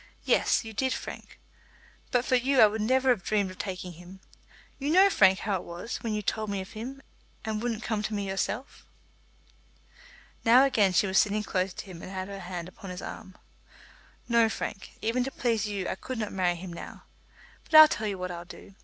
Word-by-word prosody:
Yes, - - +2
you 220 - -7
did, 260 +4 0
Frank. - - -8 0.7
But 245 0 +1
for 255 - +2
you 260 +2 +2
I - - +10
would 215 +1 0
never 260 +4 +2
have 240 -6 +3
dreamed 200 -2 0
of 185 - -14
taking 185 -2 -5
him. 180 +3 -13 0.6
You 280 +1 -2
know, 380 +5 +6
Frank, 190 - +5
how 200 -3 0
it - - -8
was, 175 +7 -6
when 230 - -4
you 210 - -3
told 215 +1 -2
me 200 -1 -2
of 190 - -7
him 260 +5 -7 0.4
and 215 -1 -2
wouldn't 235 -2 -2
come 220 -2 -1
to 215 - -3
me 200 -1 -2
yourself." 205 +7 -3 1.6
Now 245 +3 +7
again 210 -8 +3
she 180 - +4
was 190 0 +3
sitting 210 +1 +1
close 185 -2 -1
to - - -7
him 180 -4 -10
and - - -8
had 190 0 -5
her 200 0 -7
hand 175 -2 -6
upon 195 +1 -11
his 180 0 -7
arm. 190 - -8 0.9
"No, 235 -2 +4
Frank; 210 -2 -5
even 235 +3 +1
to 265 - -3
please 225 -5 0
you 200 -3 -3
I - - -1
could 255 +6 -6
not 215 -2 -3
marry 180 -2 +1
him 175 0 -8
now. - - -9 0.6
But 315 - -2
I'll 310 0 +12
tell 220 -6 -2
you 200 -2 -3
what 180 0 -4
I'll 175 -1 -6
do. 180 +2 -13
210 Hz, 215 wpm, -28 LUFS, 190-235 Hz, 1.6 s, I'll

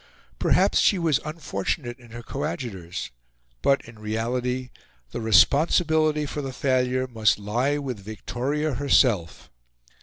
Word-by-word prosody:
Perhaps - - +3
she 200 - +4
was 165 -6 +2
unfortunate 135 - -4
in 120 -1 -16
her 120 +1 -9
coadjutors, 115 - -5 0.5
but, 140 0 +2
in 115 -1 -14
reality, 125 +4 -2 0.4
the - - -4
responsibility 150 - +3
for 145 +1 -4
the 135 -1 -5
failure 130 -1 +1
must 110 -4 +2
lie 120 +8 0
with 130 -6 -4
Victoria 130 +8 -3
herself. 120 - +1
125 Hz, 120 wpm, -25 LUFS, 110-145 Hz, 0.5 s, she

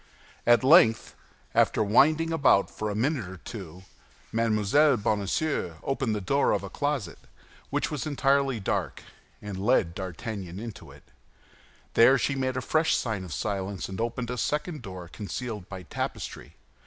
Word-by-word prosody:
At 120 +1 +6
length, 130 -6 +5 0.4
after - - +3
winding 155 +10 +3
about 140 -10 +3
for 110 - -4
a 100 - -3
minute 125 - -1
or 95 - -9
two, 95 -3 -9 0.5
Mme. 110 -2 +1 0.3
Bonacieux 105 - -1
opened 135 -5 -1
the - - -1
door 135 +9 +2
of - - -1
a - - -7
closet, 145 - -2 0.5
which - - -1
was 150 +1 -3
entirely 135 -3 +1
dark, 95 - -2 0.4
and 100 -2 -5
led 85 -4 +2
D'Artagnan 95 0 -6
into 115 0 -8
it. - - -15 0.9
There 130 +4 +6
she 140 - 0
made 130 -1 -1
a - - -1
fresh 160 +4 +2
sign 110 -6 -2
of 90 - -9
silence, 95 +2 -3
and 95 +3 -4
opened 120 +1 -3
a 125 - -3
second 150 +4 -2
door 95 -5 -8
concealed 105 +1 -6
by 95 -2 -7
tapestry. - - -5
115 Hz, 155 wpm, -27 LUFS, 100-135 Hz, 0.9 s, At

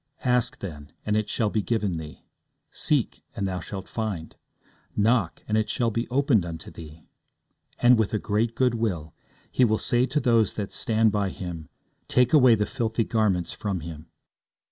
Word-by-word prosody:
Ask, 125 -1 +2
then, 75 -6 -7
and 105 - +1
it 110 -1 0
shall 110 -3 0
be 110 - +1
given 105 -5 -1
thee; 80 -1 -9 0.5
seek, - - 0
and 100 - -1
thou 90 -1 -3
shalt 95 +3 -7
find; 100 -8 -4 0.6
knock, 105 -4 +2
and 110 - 0
it 110 - -1
shall 120 -2 +1
be 115 +2 -2
opened 130 - +3
unto 85 -2 -7
thee. 80 -1 -11 0.7
And 120 -1 +5
with 110 - +1
a 110 - +1
great 110 +3 0
goodwill, 110 -11 0 0.4
He 130 - +3
will 110 -2 +3
say 120 +3 +1
to 150 +4 0
those 115 -6 +2
that 105 -2 -4
stand 110 -1 +2
by 100 -1 0
Him, 85 -5 -7 0.4
Take 125 +1 +3
away 130 -6 +7
the 105 -1 0
filthy 115 -2 -1
garments 105 -7 0
from 100 -5 -3
him. 80 0 -8
110 Hz, 170 wpm, -26 LUFS, 90-115 Hz, 0.7 s, away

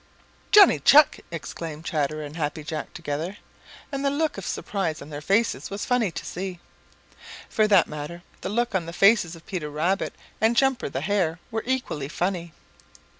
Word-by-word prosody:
"Johnny 415 -1 +8
Chuck!" 300 0 +6
exclaimed 165 -1 -6
Chatterer 155 -1 -1
and 145 +1 -8
Happy 155 -1 -3
Jack 155 +1 -5
together, 160 +7 -4 0.5
and 275 0 -3
the 280 - +3
look 305 +2 0
of - - -6
surprise 170 -6 -2
on 155 - -10
their 145 0 -6
faces 205 +8 +1
was 200 +1 -4
funny 245 -5 +2
to - - -7
see. 185 0 -5 0.9
For 215 -1 +2
that 200 -4 +6
matter, 150 +4 -7 0.2
the - - -3
looks 235 +2 0
on 175 -4 0
the 170 - -6
faces 195 -3 +4
of 165 - -15
Peter 170 -6 -4
Rabbit 170 +7 -1 0.3
and 225 +2 +3
Jumper 270 - +2
the 135 0 -3
Hare 175 -2 0
were 225 0 -1
equally 250 - -1
funny. 175 +2 -2
180 Hz, 175 wpm, -25 LUFS, 155-220 Hz, 0.9 s, Johnny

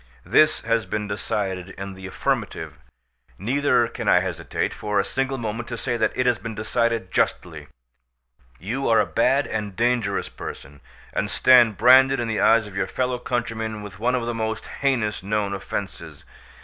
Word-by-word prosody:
This 155 0 +4
has 115 0 0
been 105 -1 -3
decided 95 -2 -3
in 95 0 -6
the 95 0 -9
affirmative, 95 - -3 0.6
neither 125 +3 +2
can - - -6
I - - +5
hesitate - - -3
for 105 -1 -1
a - - +1
single 135 0 -2
moment 115 0 -4
to 120 - -4
say 120 +1 -2
that 110 -2 +1
it 125 - 0
has 120 -4 +2
been 110 +2 -6
decided 110 -1 -1
justly. - - -1 0.9
You 120 - -3
are 115 - +5
a - - +3
bad 135 +3 +2
and 105 -3 -4
dangerous 115 -3 0
person, 70 +1 -9 0.3
and - - -1
stand 120 -5 +5
branded 130 +3 +6
in 120 - -1
the 110 -1 -1
eyes 115 -1 +5
of 105 -2 -11
your 100 - -1
fellow 125 -1 -2
countrymen 110 -3 -3
with 100 -2 -10
one 125 +3 +1
of 120 -2 -1
the 120 - -2
most 110 -1 -3 0.2
heinous 120 -7 0
known 100 +1 -1
offences. 100 - -6
115 Hz, 175 wpm, -23 LUFS, 105-125 Hz, 0.9 s, branded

